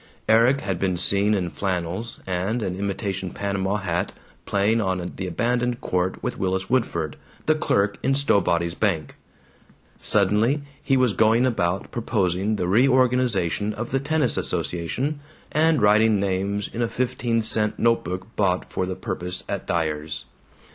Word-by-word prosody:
Erik 120 +5 +4
had 95 -3 -2
been 95 -2 0
seen 100 +4 +3
in 90 -4 -2
flannels 95 +3 -3
and 95 +6 -1
an 90 -2 -2
imitation 95 -1 -3
panama 100 +1 -2
hat, 90 -4 -2 0.3
playing 105 +3 +2
on 95 -3 -2
the 95 - -3
abandoned 120 +6 0
court 90 0 -1
with - - -3
Willis 95 +2 -1
Woodford, 85 - 0 0.3
the 155 - +4
clerk 100 -9 0
in 135 +1 +2
Stowbody's 85 -11 +2
bank. 85 -8 -1 0.9
Suddenly 105 +8 +2 0.2
he 135 - +2
was 125 -4 +3
going 115 +4 +4
about 95 -7 -1
proposing 100 -3 0
the 90 -4 -1
reorganization 120 -4 +2
of 120 +2 -5
the 135 - +2
tennis 150 -2 +1
association, 90 - -2 0.3
and 155 -5 +3
writing 105 0 +5
names 100 +1 -1
in 115 - -5
a 120 - +2
fifteen 120 -2 -1
cent 110 -1 0
note 115 0 +2
book 90 +5 -6
bought 95 -3 +1
for 90 - -1
the 95 - -3
purpose 90 -4 -4
at - - -4
Dyer's. 75 -3 -2
100 Hz, 150 wpm, -24 LUFS, 90-115 Hz, 0.9 s, writing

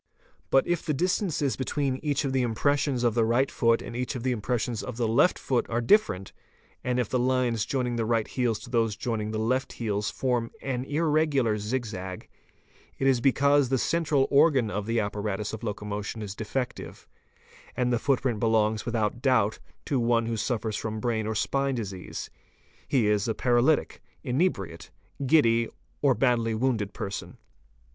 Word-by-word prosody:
But 135 - +4
if 175 -1 -1
the 155 -4 -1
distances 170 -4 0
between 135 0 -1
each 145 0 -1
of 135 - -1
the 130 - +2
impressions 130 +2 +1
of 120 -2 +3
the 120 - +2
_ - - +1
right 130 +4 +2
foot 115 -1 +2
and 120 - -7
each 125 +2 -2
of 120 - -5
the 130 - +1
impressions 120 0 -1
of 125 -2 -6
the 120 -2 +1
left 115 +11 +3
foot 125 -3 0
are 120 - 0
different, 115 - +2 0.5
and 125 0 0
if 120 - 0
the 125 - 0
lines 125 -3 +1
joining 125 -3 -1
the 115 - 0
right 115 -1 +1
heels 115 -4 -1
and 120 - -13
those 115 -3 +2
joining 110 -1 -2
the 110 - -3
left 125 +4 0
heels 105 -2 -2
form 120 -3 -1
an 130 -2 -2
irregular 145 -7 +1
zig 120 +4 -2
zag, 95 -3 -7 0.7
it 135 - -1
is 130 -3 +3
because 140 +1 +3
the 130 - +2
central 155 -1 +1
organ 140 -6 +4
of 105 0 -3
the 115 0 +1
apparatus 105 0 -2
of 110 - -5
loco 105 -2 -4
motion 105 +2 -4
is 100 -2 -5
defective, 125 +4 -5 0.7
and 125 -1 +1
the 120 - +2
footprint 130 -3 0
belongs 110 -2 +1
without 110 +1 -1
doubt 115 -6 +2 0.3
to 135 - 0
one 115 -1 +2
who 115 - -2
_ 110 - -2
suffers 110 -3 -1
from 110 0 -3
brain 110 -2 -1
or 110 - -2
spine 135 +5 0
disease: 100 -6 -6 0.6
he 130 -6 +2
is 105 0 +2
a 110 - -1
paralytic, 125 +5 +2 0.2
inebriate, 125 - -1 0.4
giddy, 115 -6 +4 0.3
or 135 -3 +4
badly 115 -4 +1
wounded 110 -4 0
person. 100 0 -6
120 Hz, 180 wpm, -27 LUFS, 110-135 Hz, 0.7 s, But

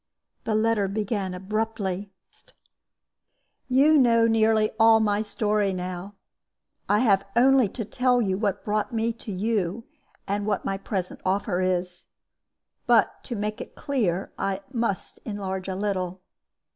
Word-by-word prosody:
The 220 - 0
letter 215 -2 +2
began 200 -2 -2
abruptly: 200 -1 -3 1.6
"You 285 +4 +5
know 230 -3 +4
nearly 220 -1 +3
all 225 0 +7
my 210 -1 +1
story 210 -2 0
now. 185 +2 -5 0.7
I 210 +2 +4
have 200 -5 +3
only 255 -2 +5
to 225 +2 -5
tell 250 +3 +2
you 195 -5 +1
what 200 -1 -2
brought 210 +3 -1
me 230 0 0
to 225 -1 -8
you, 200 +1 -1 0.4
and 205 +1 -2
what 205 -2 -1
my 195 0 -2
present 190 -2 -4
offer 190 -1 0
is. 180 -1 -2 0.8
But - - +3
to 240 - -3
make 210 +2 -3
it - - -10
clear, 210 - -1
I 195 0 -1
must 230 -6 -2
enlarge 190 -3 -4
a 190 - -3
little. 185 -2 -2
205 Hz, 135 wpm, -25 LUFS, 190-225 Hz, 1.6 s, all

